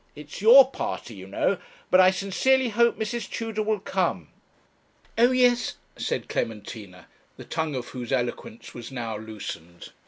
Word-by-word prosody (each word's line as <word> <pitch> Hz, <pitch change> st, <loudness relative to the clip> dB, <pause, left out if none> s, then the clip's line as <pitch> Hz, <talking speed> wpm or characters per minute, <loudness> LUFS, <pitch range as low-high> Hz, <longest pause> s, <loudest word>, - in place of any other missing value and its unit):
It's 150 Hz, +4 st, -9 dB
your 250 Hz, +5 st, +9 dB
party, 120 Hz, -, -4 dB
you 95 Hz, -2 st, -10 dB
know 175 Hz, -, 0 dB, 0.3 s
but 185 Hz, -, +6 dB
I 185 Hz, 0 st, +8 dB
sincerely 240 Hz, +7 st, +1 dB
hope 235 Hz, +2 st, +3 dB
Mrs. 220 Hz, 0 st, -3 dB
Tudor 225 Hz, -2 st, -3 dB
will 215 Hz, -1 st, 0 dB
come.' 175 Hz, -, -1 dB, 0.9 s
'Oh 235 Hz, +2 st, +5 dB
yes,' 250 Hz, -1 st, +2 dB, 0.2 s
said -, -, -3 dB
Clementina, 105 Hz, -3 st, -5 dB, 0.3 s
the -, -, -10 dB
tongue 160 Hz, -3 st, -2 dB
of 125 Hz, -1 st, -5 dB
whose 125 Hz, -1 st, -7 dB
eloquence 135 Hz, -, -3 dB
was 120 Hz, +1 st, -9 dB
now 115 Hz, -4 st, -4 dB
loosened. 105 Hz, -6 st, -8 dB
180 Hz, 150 wpm, -25 LUFS, -, 0.9 s, your